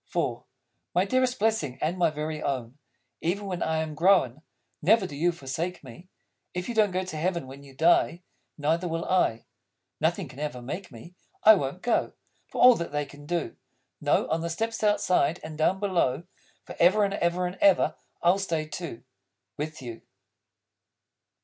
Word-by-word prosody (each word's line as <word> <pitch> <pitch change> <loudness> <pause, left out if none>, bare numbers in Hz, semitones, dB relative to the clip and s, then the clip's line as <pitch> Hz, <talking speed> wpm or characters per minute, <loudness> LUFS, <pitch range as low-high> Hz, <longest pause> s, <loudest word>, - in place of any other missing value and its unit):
IV - - 0 0.5
My 180 +2 +4
dearest 255 +3 +1
Blessing 210 - 0
and 160 +4 0
my 175 -3 +3
Very 155 0 -4
Own, 130 -1 -3 0.4
Even 200 +5 -1
when 180 -3 -4
I 160 0 0
am 155 -1 -6
grown, 155 -5 +3 0.4
Never 205 +5 +4
do 145 - -7
you 170 +5 +2
forsake 165 +4 -4
me! 135 +8 -13 0.5
If 180 0 -3
you 240 - -3
don't 215 -2 +4
go 185 0 -1
to 185 -4 -6
heaven 170 -1 -1
when 135 +2 -11
you 140 -1 -15
die, 170 +3 +3 0.3
Neither 160 +4 0
will 165 0 -2
I: 150 -11 +1 0.5
Nothing - - 0
can 135 - -12
ever 150 -4 -3
make 165 +9 -6
me! 125 +9 -12 0.3
I 220 - +10
won't 160 -1 -2
go, 240 - +1 0.3
For - - -7
all 250 0 +10
that 170 - -4
they 145 0 -1
can 145 +1 -14
do. 170 -1 -2 0.5
No; - - +2
on 160 - 0
the 170 - -2
steps 225 +6 -3
Outside, 200 -6 +2
and 155 0 -7
down, 160 +5 +1
below, 170 -8 +1 0.4
Forever 190 +5 +3
and 195 - -2
ever 175 -1 0
and 180 +2 -4
ever, 195 -3 +5 0.3
I'll 175 +3 +4
stay 165 -5 -1
too! 155 -5 -7 0.5
With 155 -1 -5
You. 115 -2 -7
170 Hz, 175 wpm, -27 LUFS, 150-185 Hz, 0.5 s, I